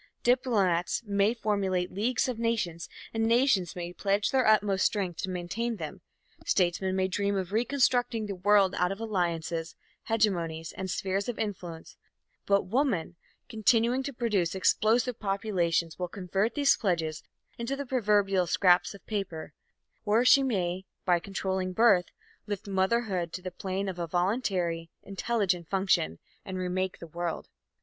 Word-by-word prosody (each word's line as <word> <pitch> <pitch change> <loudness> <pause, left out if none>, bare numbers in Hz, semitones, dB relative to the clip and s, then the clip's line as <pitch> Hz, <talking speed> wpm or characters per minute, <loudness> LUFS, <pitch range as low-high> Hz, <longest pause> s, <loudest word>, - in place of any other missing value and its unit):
Diplomats 215 -9 +2
may 200 +2 +2
formulate 195 -5 -1
leagues 235 +7 0
of 245 -3 -3
nations 210 -8 -1 0.2
and 225 0 0
nations 230 - +2
may 175 0 -5
pledge 200 +2 0
their 260 -3 +2
utmost 205 -3 +3
strength 185 -5 0
to 190 - -3
maintain 185 +7 -3
them, 180 0 -7 0.4
statesmen 185 +1 +1
may 190 0 +1
dream 200 +1 -1
of 190 -1 -3
reconstructing 245 -1 +1
the 205 - -4
world 195 +1 +3
out 180 +1 +2
of 195 - -5
alliances, 170 -6 -2 0.3
hegemonies 170 -8 0
and 190 -1 -4
spheres 195 +3 -1
of 240 - -4
influence, 180 -6 -5 0.5
but 200 0 +3
woman, 200 - 0 0.3
continuing 235 +2 +2
to 280 +1 -4
produce 210 -9 0
explosive 225 +5 +2
populations, 185 -5 -1
will 180 - -1
convert 195 +4 -2
these 285 -1 +4
pledges 165 -7 -1 0.4
into 235 +4 -2
the 280 0 -5
proverbial 205 -7 +2
scraps 180 +2 +3
of 200 - -16
paper; 195 -7 -4 0.5
or 220 +3 +2
she 275 - +7
may, 190 -8 -1 0.2
by 175 -2 +3
controlling 190 0 -3
birth, 200 -4 +5 0.4
lift 205 -1 -4
motherhood 190 -2 0
to 185 - -6
the 185 - -5
plane 190 +2 -3
of 185 -2 -4
a 170 - -2
voluntary, 175 -2 -1
intelligent 195 -4 -1
function, 190 - +1 0.3
and 190 -1 -6
remake 185 0 -2
the - - -9
world. 170 +1 -4
195 Hz, 145 wpm, -29 LUFS, 180-225 Hz, 0.5 s, she